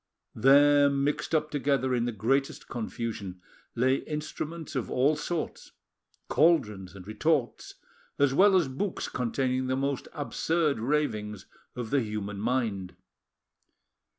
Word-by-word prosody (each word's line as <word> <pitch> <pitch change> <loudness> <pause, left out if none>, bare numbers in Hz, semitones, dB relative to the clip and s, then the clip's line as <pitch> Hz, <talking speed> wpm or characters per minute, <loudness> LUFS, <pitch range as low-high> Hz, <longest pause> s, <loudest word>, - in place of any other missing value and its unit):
There, 145 +4 +6
mixed 140 +3 0
up 155 0 0
together 140 -2 +1
in 120 -1 +1
the 120 - -1
greatest 135 +6 -1
confusion, 110 -5 -5 0.4
lay 130 +3 +3
instruments 155 +1 -5
of 130 - -2
all 140 +5 +2
sorts, 160 +2 -4 0.5
caldrons 105 - +2
and 95 -2 -10
retorts, 125 +5 -1 0.4
as 140 -1 +3
well 195 +6 +5
as 170 -6 +2
books 155 +9 -3
containing 130 +1 -1
the 130 - 0
most 135 0 -2
absurd 150 -1 0
ravings 110 -7 -1 0.3
of 120 -3 -5
the 140 -1 +3
human 105 -2 -4
mind. 110 -5 -1
130 Hz, 125 wpm, -28 LUFS, 115-145 Hz, 0.5 s, There